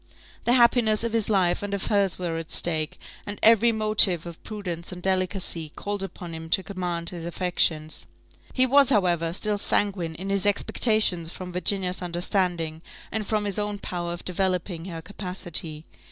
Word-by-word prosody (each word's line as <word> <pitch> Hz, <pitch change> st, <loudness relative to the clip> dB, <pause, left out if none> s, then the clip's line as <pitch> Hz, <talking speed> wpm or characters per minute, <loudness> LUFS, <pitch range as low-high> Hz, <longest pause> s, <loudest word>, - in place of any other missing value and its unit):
The 240 Hz, -, +4 dB
happiness 235 Hz, -3 st, +4 dB
of 230 Hz, -1 st, -2 dB
his 225 Hz, -2 st, +1 dB
life 185 Hz, -4 st, +2 dB
and 205 Hz, 0 st, -2 dB
of 195 Hz, -, -4 dB
hers 200 Hz, -3 st, +1 dB
were 170 Hz, -3 st, -2 dB
at 165 Hz, -, -8 dB
stake, 155 Hz, -3 st, 0 dB, 0.3 s
and 205 Hz, 0 st, -3 dB
every 230 Hz, +1 st, +6 dB
motive 215 Hz, -6 st, +4 dB
of 170 Hz, -1 st, -9 dB
prudence 180 Hz, -6 st, -6 dB
and 180 Hz, -, -6 dB
delicacy 185 Hz, -4 st, -1 dB
called 205 Hz, -1 st, -3 dB
upon 180 Hz, -3 st, -7 dB
him 160 Hz, 0 st, -7 dB
to 190 Hz, -, +2 dB
command 175 Hz, -4 st, -3 dB
his 175 Hz, -2 st, -7 dB
affections. 165 Hz, -3 st, 0 dB, 0.4 s
He 255 Hz, -, +4 dB
was, 275 Hz, +1 st, +5 dB
however, 175 Hz, -8 st, +2 dB
still 205 Hz, +3 st, 0 dB
sanguine 185 Hz, -6 st, 0 dB
in 190 Hz, +4 st, -5 dB
his 200 Hz, +1 st, +2 dB
expectations 205 Hz, -4 st, +1 dB
from 185 Hz, -1 st, -7 dB
Virginia's 185 Hz, 0 st, 0 dB
understanding, 175 Hz, -2 st, -1 dB, 0.3 s
and 215 Hz, -1 st, -3 dB
from 215 Hz, -1 st, 0 dB
his 205 Hz, 0 st, -2 dB
own 205 Hz, 0 st, -2 dB
power 175 Hz, -3 st, -4 dB
of 175 Hz, -, -7 dB
developing 180 Hz, -2 st, -1 dB
her 165 Hz, -3 st, -7 dB
capacity. 175 Hz, -5 st, -2 dB
185 Hz, 170 wpm, -25 LUFS, 170-205 Hz, 0.4 s, every